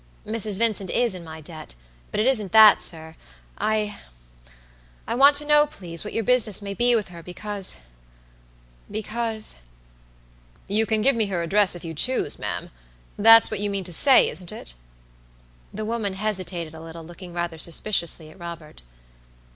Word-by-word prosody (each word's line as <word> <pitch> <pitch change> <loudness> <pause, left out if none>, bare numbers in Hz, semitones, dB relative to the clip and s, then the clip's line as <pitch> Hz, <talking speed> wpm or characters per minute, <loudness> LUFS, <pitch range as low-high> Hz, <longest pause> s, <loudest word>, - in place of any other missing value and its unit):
"Mrs. 215 -2 +3
Vincent 215 -4 0
is 240 +1 0
in 180 -2 -9
my 160 -1 -10
debt; 155 - -11 0.3
but - - -4
it 215 - +1
isn't 215 -8 0
that, 220 -2 +7
sir. 160 -1 -6 0.5
II 215 -1 -1 1.1
want 280 +4 +4
to 295 +1 +3
know, 295 0 +4
please, 170 - -5
what 210 - -7
your 225 - -2
business 220 -3 +3
may 200 -1 -6
be 240 +3 +2
with 210 -4 -2
herbecausebecause" 180 - -3 2.9
"You 215 +3 +1
can 215 -1 0
give 275 +1 +4
me 220 -2 0
her 180 -3 -3
address 195 +2 +3
if 175 - -10
you 165 - -6
choose, 255 - -1
ma'am. - - -5 0.4
That's 225 +2 +6
what 215 - -3
you 205 0 -2
mean 200 -1 -3
to 180 -1 -4
say, 265 - +6
isn't 180 -2 -3
it?" - - -10 1.0
The 215 +1 -6
woman 220 -3 -3
hesitated 185 -5 -3
a 160 - -11
little, 165 0 -10
looking 175 +2 -12
rather 170 -1 -4
suspiciously 170 -2 -1
at 185 - -19
Robert. 170 - -10
200 Hz, 155 wpm, -23 LUFS, 170-220 Hz, 2.9 s, that